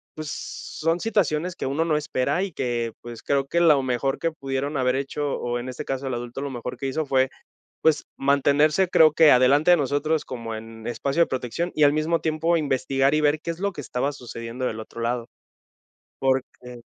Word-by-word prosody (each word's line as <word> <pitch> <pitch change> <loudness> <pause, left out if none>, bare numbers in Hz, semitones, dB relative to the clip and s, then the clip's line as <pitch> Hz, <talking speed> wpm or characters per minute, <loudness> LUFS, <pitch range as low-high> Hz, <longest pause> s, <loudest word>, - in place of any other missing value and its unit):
pues, 155 -1 -6
son 165 +2 -3
situaciones 180 -5 0
que - - -4
uno 140 +5 0
no 155 -2 +2
espera 150 +4 -1
y 195 - -4
que, 120 -3 -2
pues, 120 -1 -9
creo 140 -1 +1
que 170 - +1
lo 150 -5 +5
mejor 130 +2 -1
que 165 - 0
pudieron 140 -1 -3
haber 125 -1 +1
hecho 140 +1 -2
o 120 0 -2
en 120 - -6
este 125 - -6
caso, 135 0 -3
el 130 - -2
adulto, 120 +2 -6
lo 140 - -3
mejor 125 0 -6
que 135 - -3
hizo 155 +4 -1
fue, 130 -1 +2 0.5
pues, 155 -2 +3
mantenerse, 145 +5 +3
creo 155 -3 +6
que 160 -2 +6
adelante 140 +6 +5
de 175 - +7
nosotros 145 +2 0
como 115 -3 -6
en 110 0 -10
espacio 140 +6 0
de - - -3
protección 130 +7 -3
y 155 - +3
al 145 - +6
mismo 155 +2 +1
tiempo 160 +2 +1
investigar 135 -2 +1
y 155 - +2
ver 150 +1 +2
qué 170 - -3
es 165 - -9
lo 200 0 0
que - - -9
estaba 135 +1 -2
sucediendo 120 -2 -6
del 110 -2 -3
otro 115 +1 -11
lado. 120 0 -1 0.9
Porque. 125 -2 -2
140 Hz, 205 wpm, -24 LUFS, 125-155 Hz, 0.9 s, de